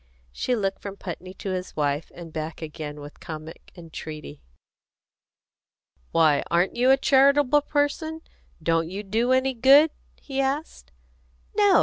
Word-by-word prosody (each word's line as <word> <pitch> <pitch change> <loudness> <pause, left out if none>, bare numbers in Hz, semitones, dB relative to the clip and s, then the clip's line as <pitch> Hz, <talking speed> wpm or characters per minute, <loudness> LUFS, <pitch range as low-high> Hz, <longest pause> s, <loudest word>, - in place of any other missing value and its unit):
She 245 - -1
looked 195 -3 -2
from 200 -1 -7
Putney 185 0 -7
to 195 - -5
his 185 0 -4
wife, 145 +1 -1
and 170 -2 -10
back 155 0 -5
again 150 -1 -7
with 145 +1 -11
comic 155 0 -9
entreaty. 155 -3 -9 1.7
"Why, 155 -3 +4
aren't 175 +2 +2
you 250 +2 +3
a 270 - +7
charitable 280 +1 +4
person? 310 +2 -1 0.4
Don't 165 0 +1
you 195 +3 -5
do 225 +5 0
any 260 +1 +3
good?" 275 +6 +6 0.3
he 275 -1 -3
asked. 270 - -3 0.6
"No!" 405 -4 +5
195 Hz, 135 wpm, -25 LUFS, -, 1.7 s, a